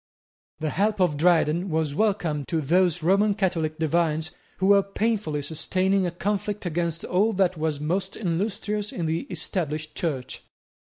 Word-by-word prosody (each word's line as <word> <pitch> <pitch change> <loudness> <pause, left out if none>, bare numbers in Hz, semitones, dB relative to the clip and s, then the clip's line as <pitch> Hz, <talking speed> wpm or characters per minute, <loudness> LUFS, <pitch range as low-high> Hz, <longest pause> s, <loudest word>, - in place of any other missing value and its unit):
The 155 -1 -1
help 210 +1 +1
of 175 -5 +3
Dryden 170 +2 +2
was 160 -3 0
welcome 170 -6 0
to 165 - 0
those 175 +2 +2
Roman 200 +4 +3
Catholic 165 -6 -1
divines 160 0 0 0.3
who 190 - 0
were 200 0 +7
painfully 200 -6 -1
sustaining 185 +5 0
a - - -2
conflict 205 +3 -2
against 170 -1 -1
all 205 +5 +2
that 185 -2 +2
was 155 -2 -1
most 185 +6 -2
illustrious 205 +2 -2
in 170 - -3
the 165 - -2
Established 155 -4 -3
Church. 135 -7 -3
175 Hz, 150 wpm, -25 LUFS, 155-195 Hz, 0.3 s, were